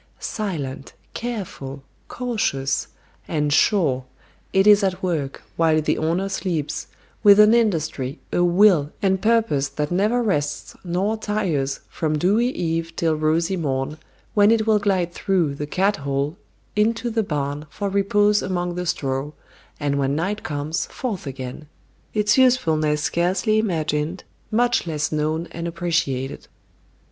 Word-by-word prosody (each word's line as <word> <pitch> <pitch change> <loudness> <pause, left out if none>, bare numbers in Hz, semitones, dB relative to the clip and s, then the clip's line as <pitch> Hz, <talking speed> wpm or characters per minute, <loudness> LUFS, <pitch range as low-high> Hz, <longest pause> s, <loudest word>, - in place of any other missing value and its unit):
Silent, 150 -11 -4 0.2
careful, 180 - -5 0.2
cautious, 215 - -1 0.4
and 150 -2 0
sure, 150 - +3 0.5
it 190 +1 +3
is 205 -1 +7
at 190 -1 -1
work, 155 -7 -2
while 160 -1 +3
the 155 - +1
owner 170 +5 0
sleeps, 165 -6 -3 0.3
with 205 -1 +7
an 210 +1 +7
industry, 160 - 0 0.2
a 175 - +3
will, 175 -4 +4
and 190 -1 +2
purpose 215 -12 +2
that 150 +2 -3
never 215 +7 +2
rests 145 -9 -1
nor 190 +5 0
tires 180 -11 -1
from 155 -2 -1
dewy 205 +9 +2
eve 165 -6 -2
till 165 -2 +1
rosy 160 +4 +1
morn, 145 -2 -2 0.3
when 205 0 +5
it 225 -1 +3
will 215 -1 +4
glide 190 -4 0
through 180 -8 0
"the 145 +1 -5
cat 195 +6 +1
hole" 140 +2 -2 0.4
into 225 +3 +1
the 225 0 +1
barn 145 -4 -3
for 200 +6 -4
repose 205 +1 +3
among 175 -1 -2
the 180 0 -4
straw, 135 -3 -2 0.5
and 140 -1 0
when 140 0 +1
night 195 +7 -1
comes, 150 +2 -3
forth 210 - -4
again; 130 +2 -7 0.4
its 210 +3 +2
usefulness 155 -13 +3
scarcely 185 +7 +1
imagined, 160 -4 -1 0.3
much 240 -3 +2
less 150 -2 -1
known 155 +2 -1
and 170 0 -4
appreciated. 165 -6 -2
170 Hz, 135 wpm, -22 LUFS, 150-205 Hz, 0.5 s, is